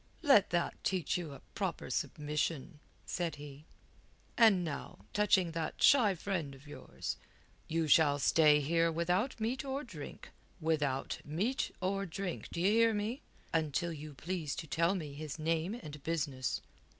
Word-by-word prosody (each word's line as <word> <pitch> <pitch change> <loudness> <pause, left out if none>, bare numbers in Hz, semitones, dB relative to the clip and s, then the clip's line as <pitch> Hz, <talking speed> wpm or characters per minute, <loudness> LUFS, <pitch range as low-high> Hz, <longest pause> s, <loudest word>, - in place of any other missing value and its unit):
"Let 275 - +6
that 170 0 -1
teach 185 -4 0
you 170 -4 -3
a - - -12
proper - - -3
submission," 150 0 -2 0.3
said 170 -3 -2
he. 145 0 -10 0.7
"And 215 -6 +6
now 140 - -6
touching 190 -4 +3
that 165 -1 -3
shy 230 -9 +6
friend 165 -6 -3
of 135 +2 -16
yours, 145 - -6 0.5
you 165 0 0
shall 145 -1 +5
stay 150 +1 +5
here 165 +3 +2
without 180 +10 0
meat 240 +6 -1
or 275 +1 -3
drink 165 - -9 0.3
without 150 -5 0
meat 200 - -1
or 195 +1 -1
drink, 180 +1 -4
d' - - -8
ye 185 +4 +3
hear 225 0 +4
me? 220 +7 -2 0.3
until 165 +1 0
you 150 -1 -8
please 160 0 -3
to - - -5
tell 170 +5 +1
me 155 -6 -5
his 150 +1 -6
name 165 +5 0
and 150 - -9
business." 145 -5 -2
165 Hz, 150 wpm, -33 LUFS, 150-195 Hz, 0.7 s, Let